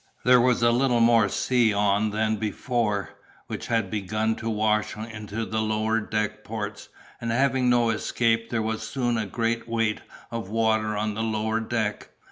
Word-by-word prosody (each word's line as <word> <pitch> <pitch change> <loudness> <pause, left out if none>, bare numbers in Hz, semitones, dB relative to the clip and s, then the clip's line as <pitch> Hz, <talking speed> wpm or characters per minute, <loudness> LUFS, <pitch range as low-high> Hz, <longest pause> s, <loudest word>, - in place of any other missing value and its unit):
There 125 -1 +7
was 125 -1 +2
a 120 - +5
little 120 0 +2
more 115 -2 +5
sea 120 +1 +2
on 105 +1 +2
than 110 +1 0
before, 105 -1 -1 0.3
which - - -6
had 115 -5 0
begun 110 +2 -1
to 115 - -4
wash 110 -1 0
into 110 0 -5
the 110 0 -2
lower 110 +1 +1
deck 105 0 -2
ports, 105 -1 -6 0.3
and 115 - -3
having 130 +1 +2
no 120 -2 +3
escape 115 +1 0
there 115 -2 -1
was 110 0 -2
soon 120 -3 -1
a 110 -2 -1
good 115 +3 -1
weight 115 -2 0 0.3
of 115 -5 -5
water 110 -1 +1
on 105 0 -1
the 110 - -3
lower 110 0 0
deck. 110 -2 -2
110 Hz, 170 wpm, -25 LUFS, 105-115 Hz, 0.3 s, There